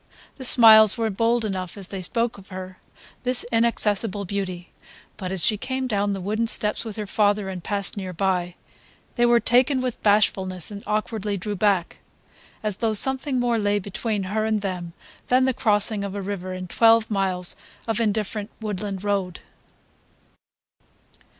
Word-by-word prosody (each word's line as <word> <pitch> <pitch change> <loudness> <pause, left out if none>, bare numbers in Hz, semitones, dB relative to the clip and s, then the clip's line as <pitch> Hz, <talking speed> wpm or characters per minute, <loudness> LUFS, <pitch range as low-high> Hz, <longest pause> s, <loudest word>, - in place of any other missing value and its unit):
The 265 - -8
smiles 220 -3 +7
were 225 -1 0
bold 230 +3 +1
enough 185 -2 -4
as 195 -2 -4
they 195 -2 -5
spoke 230 +4 -1
of 195 - -16
her, 185 0 -8 0.4
this 250 0 +2
inaccessible 215 -3 +1
beauty; 185 -2 -5 0.4
but 185 -2 -6
as 190 -4 0
she 215 - +2
came 260 +4 -3
down 205 -4 0
the 195 - -4
wooden 215 +5 -1
steps 210 -1 +2
with 220 -3 -6
her 215 - -4
father 205 0 +1
and 185 -2 -6
passed 200 -1 -2
near 190 -2 -4
by, 180 -1 -1 0.6
they 240 -1 +2
were 240 0 +5
taken 255 +4 +3
with 255 -2 -3
bashfulness 190 -3 +1
and 200 -1 -7
awkwardly 215 -1 -2
drew 205 +2 -4
back, 195 -3 +1 0.7
as 210 -3 -1
though 225 -2 0
something 265 +4 +1
more 240 -2 +1
lay 205 0 +1
between 205 +1 -3
her 210 +3 -2
and 215 -1 0
them 180 -4 -4 0.3
than 255 +1 +3
the 260 - +1
crossing 210 -2 +2
of 200 0 -5
a 200 - -3
river 190 -2 -5
and 185 -1 -7
twelve 225 -1 +4
miles 185 -3 -1 0.3
of 225 -1 -1
indifferent 215 -1 -1
woodland 205 -2 -4
road. 195 -4 -2
205 Hz, 165 wpm, -23 LUFS, 190-225 Hz, 0.7 s, smiles